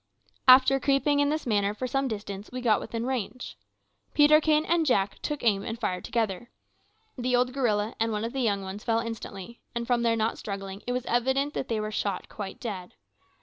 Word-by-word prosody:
After 260 +1 +8
creeping 285 +1 +2
in 285 0 +3
this 310 +1 -2
manner 205 -3 +1
for 255 - -3
some 270 +2 0
distance, 205 -3 -6
we 255 - -4
got 225 -4 +3
within 230 0 -4
range. 255 -1 -4 0.6
Peterkin 305 +1 +5
and 340 -1 +2
Jack 200 -9 +1
took 295 -1 -3
aim 205 -4 +3
and 225 +1 -5
fired 180 -6 -2
together. 225 0 -2 0.7
The 250 0 +1
old 250 +1 +2
gorilla 220 -5 0
and 225 0 +1
one 210 +1 -2
of 235 - -5
the 270 - -1
young 200 -4 +1
ones 190 +2 -7
fell 225 -1 +1
instantly, 230 -1 -6
and 235 0 -2
from 240 -1 +1
their 230 -1 +2
not 220 0 -1
struggling 195 -1 -6
it - - 0
was 250 0 -2
evident 265 +4 +1
that - - -3
they 225 -2 -1
were 215 0 -3
shot 200 -3 -2
quite 205 -3 -7
dead. 190 -6 -6
235 Hz, 200 wpm, -27 LUFS, 210-260 Hz, 0.7 s, After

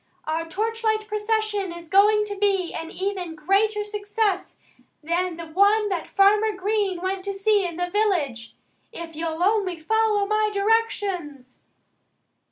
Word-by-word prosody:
Our 320 +1 -2
torchlight 440 +2 -1
procession 425 -2 -1
is 340 0 -9
going 420 +3 +4
to 410 -1 -5
be 390 -3 0
an 325 - -5
even 370 -3 -4
greater 405 +7 +1
success 415 -1 -2 0.5
than 345 +2 -1
the 335 - -7
one 405 +6 +3
that 360 -4 -3
Farmer 415 +1 +3
Green 395 -2 -1
went 375 0 -2
to 400 -1 -3
see 405 +1 +2
in 340 -1 -7
the 355 0 -1
village 310 - -1 0.4
if 335 -7 -8
you'll 325 +1 -2
only 390 -4 +1
follow 430 +4 +1
my 425 +1 +1
directions." 395 - -1
395 Hz, 140 wpm, -24 LUFS, 345-425 Hz, 0.5 s, going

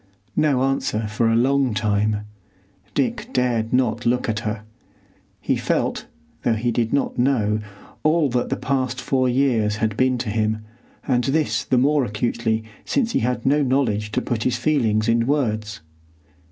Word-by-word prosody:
No 140 -4 +2
answer 135 -5 0
for 105 +2 0
a 115 - +2
long 130 0 +2
time. 105 +1 +1 0.7
Dick 140 - -1
dared 120 -3 0
not 120 -2 +1
look 125 +1 +1
at 110 -1 -1
her. 105 -1 -4 0.8
He - - +1
felt, - - -1 0.3
though 115 - +1
he 120 +2 0
did 115 0 0
not 140 -2 0
know, 110 -5 +2 0.4
all 155 0 +3
that 120 0 -1
the - - 0
past 130 -1 -1
four 130 0 +1
years 120 -5 +2
had 110 -1 -1
been 130 +1 +2
to 120 -3 -3
him, 110 0 -1 0.4
and 125 -3 +2
this 150 +3 +1
the 130 - +1
more 145 +3 +3
acutely 110 0 -1 0.2
since 240 -4 0
he - - +1
had 120 0 -1
no 145 +3 +3
knowledge 120 -6 0
to - - 0
put 115 -3 -2
his 125 +1 0
feelings 120 -6 +1
in 115 0 +2
words. 110 - -1
120 Hz, 165 wpm, -22 LUFS, 110-130 Hz, 0.8 s, all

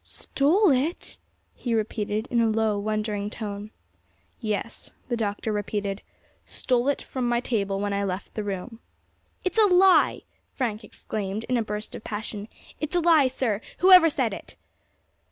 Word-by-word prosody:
"Stole 340 +7 +2
it!" 275 +6 0 0.3
he 235 -2 -2
repeated, 215 0 -1
in 235 -1 +3
a 225 - +3
low, 220 -1 +1
wondering 210 -1 -2
tone. 210 -1 -6 0.7
"Yes," 215 +1 -4 0.2
the 240 - +1
Doctor 215 -1 -2
repeated, 205 -1 -2 0.4
"stole 250 0 0
it 285 - 0
from 250 -2 -2
my 240 0 +2
table 200 -5 -1
when 205 0 -1
I 200 0 0
left 190 0 -4
the 215 - -3
room." 205 +3 -5 0.7
"It 370 - +2
is 450 - -1
a - - +6
lie!" 375 0 +5 0.3
Frank 230 -4 -2
exclaimed, 210 0 -5
in 250 - -1
a 235 - +2
burst 210 -1 -5
of - - -8
passion; 210 -1 -5 0.3
"it 305 - -2
is - - -6
a - - +4
lie, 320 -5 +5
sir, 240 -5 -1 0.2
whoever 365 -3 +8
said - - 0
it." - - -9
220 Hz, 165 wpm, -26 LUFS, 205-260 Hz, 0.7 s, whoever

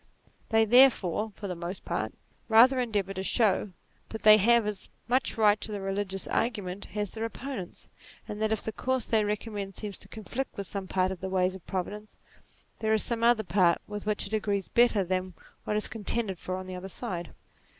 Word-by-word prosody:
They 225 0 +4
NATURE - - -11
25 - - -11
therefore, 220 -5 +5
for 205 - -6
the 185 - -3
most 175 +3 -6
part, - - -2 0.4
rather 245 +4 +6
endeavour 205 -5 -1
to 190 - -4
show, 205 0 +2 0.4
that 220 - -7
they 215 0 +9
have 235 +2 +4
as 210 -2 -4 0.2
much 250 0 +1
right 210 -1 +4
to 220 - -3
the 205 - -3
religious 195 0 -2
argu 230 -3 0
ment 185 +3 -7
as 205 -2 -2
their 225 - -5
opponents, 230 -4 -6 0.4
and 210 0 -6
that 220 0 +1
if 220 - 0
the 220 - -2
course 260 +2 -1
they 220 -2 +2
recommend 205 -2 -4
seems 205 -2 -5
to - - -7
conflict 240 +4 -5
with 200 - -4
some 195 +1 -5
part 185 0 +1
of 185 - -7
the 190 - -3
ways 185 0 +1
of 190 -3 -12
Providence, 210 +3 -5 0.6
there 220 0 +1
is 220 - +5
some 230 -1 0
other 235 -2 +4
part 180 -2 +3
with 210 0 -7
which 210 -1 +1
it 200 - -8
agrees 205 -2 -1
better 235 -4 +4
than 185 -1 -2 0.3
what 210 - -1
is 210 - +1
contended 215 -3 -2
for 185 - -4
on 185 0 -6
the 185 - -7
other 185 +1 -7
side. 180 -5 -5
210 Hz, 210 wpm, -28 LUFS, 190-225 Hz, 0.6 s, they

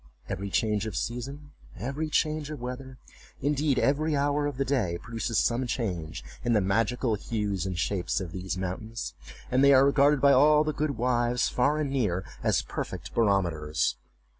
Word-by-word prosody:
Every 100 +1 -4
change 105 +1 0
of 110 - -5
season, 140 +5 -4 0.3
every 145 +5 -3
change 155 -1 0
of 150 - -6
weather, 125 +1 -6 0.4
indeed, 145 0 +1
every 150 +2 +2
hour 145 +1 +1
of 145 -3 -5
the 135 - 0
day, 115 -12 0
produces 115 -1 -3
some 120 +2 +1
change 90 - -3 0.2
in 120 - +1
the 110 - +4
magical 115 +5 +1
hues 105 -3 -2
and 95 -2 -3
shapes 95 0 -1
of 90 -4 -5
these 90 0 -4
mountains, 100 +5 -4 0.4
and 130 +2 +3
they 140 0 +7
are 135 +1 +6
regarded 140 +1 +4
by 140 +1 +5
all 150 +3 +6
the 155 0 -2
good 150 -4 -2
wives, 120 0 +1
far 145 +4 +2
and 150 -3 -1
near, 100 -9 0 0.2
as - - +2
perfect - - -6
barometers. 85 -9 +1
125 Hz, 170 wpm, -28 LUFS, 100-140 Hz, 0.4 s, they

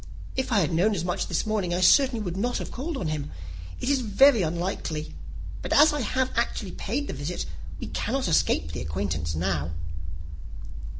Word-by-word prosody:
If 260 0 -1
I 210 -4 +4
had 165 0 0
known 200 +6 +3
as 170 -2 -2
much 175 - -1
this - - -1
morning, 205 -5 0
I 180 - 0
certainly 240 +4 +5
would 175 -3 -3
not 245 +6 0
have - - -5
called 290 +4 -4
on 170 - -2
him. 150 -1 -3 0.5
It - - -4
is 275 -1 +3
very 240 +2 +5
unlucky; 165 -2 -2 0.5
but - - -5
as 300 +1 +7
I 295 - -1
have 260 +2 0
actually - - -1
paid 290 - -3
the - - -5
visit, 150 +5 -3 0.3
we - - -4
cannot - - -1
escape 80 0 +2
the 70 - -5
acquaintance 80 -1 -2
now." 80 -2 0
180 Hz, 185 wpm, -26 LUFS, -, 0.5 s, as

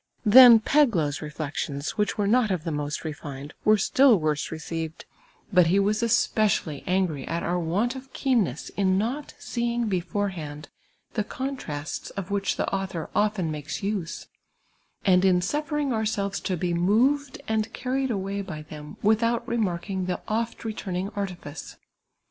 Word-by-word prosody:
Then 235 +1 +10
Peglow's 215 - +2
reflections, 150 -1 -4
which 210 0 -1
were 205 - +1
not 225 +2 +3
of 180 -5 -1
the 165 - -3
most 150 0 -3
refined, 145 -2 -7
were 215 0 +5
still 260 +2 +5
worse 155 -2 -1
received; 160 0 -5 0.5
but 180 -2 +6
he 180 +4 +3
was 205 +2 +2
especially 215 -9 +1
angiy 180 -7 0
at 165 +1 -2
our 175 +1 0
want 200 +10 0
of 265 0 -10
keenness 225 - 0
in 190 -2 +1
not 250 +8 -2
seeing 235 0 -2
beforehand 175 -6 -3 0.4
the 215 - 0
contrasts 210 - -5
of 195 0 -6
which 200 -1 0
the - - -1
author 190 -4 -3
often 205 -6 +1
makes 150 +4 -5
use, 195 -5 -3 0.8
and 185 -2 +5
in 185 -2 +4
suffering 295 - -1
ourselves 210 -3 -1
to 185 - -2
be 175 +1 -1
moved 255 +11 +2
and 220 0 0
carried 265 +1 -2
away 200 -2 -2
by 165 -6 -7
them 150 -1 -10
without 230 +2 +2
remarking 190 -4 -1
the 180 - -1
oft 230 +2 -2
returning 195 -3 -3
artifice. 180 -8 -6
195 Hz, 150 wpm, -26 LUFS, 165-225 Hz, 0.8 s, Then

